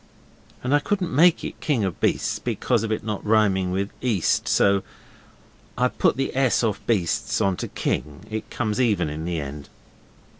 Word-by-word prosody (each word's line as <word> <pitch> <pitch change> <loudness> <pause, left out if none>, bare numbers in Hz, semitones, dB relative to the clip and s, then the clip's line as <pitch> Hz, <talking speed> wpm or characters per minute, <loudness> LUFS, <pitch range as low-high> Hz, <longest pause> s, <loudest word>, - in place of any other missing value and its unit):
And 125 +3 0
I 145 - +5
couldn't 180 +1 -2
make 165 +5 +5
it - - -7
king 135 -8 +1
of 95 -3 -2
beasts - - +1
because 120 -3 0
of 110 -1 -3
it 110 - -1
not 105 -2 -4
rhyming 100 -4 +2
with 100 +3 -2
east, 110 -9 +1
so 100 -1 +3 1.0
I 125 +1 +3
put - - +1
the 135 -1 -2
s 130 -2 +2
off 105 -2 0
beasts 100 +1 0
on 100 -3 +2
to - - -4
king. 75 -1 -3
It 110 +1 -5
comes 110 0 -1
even 100 -10 +1
in 80 +2 -5
the 85 -2 -2
end. 70 0 -7
110 Hz, 180 wpm, -24 LUFS, 95-125 Hz, 1.0 s, I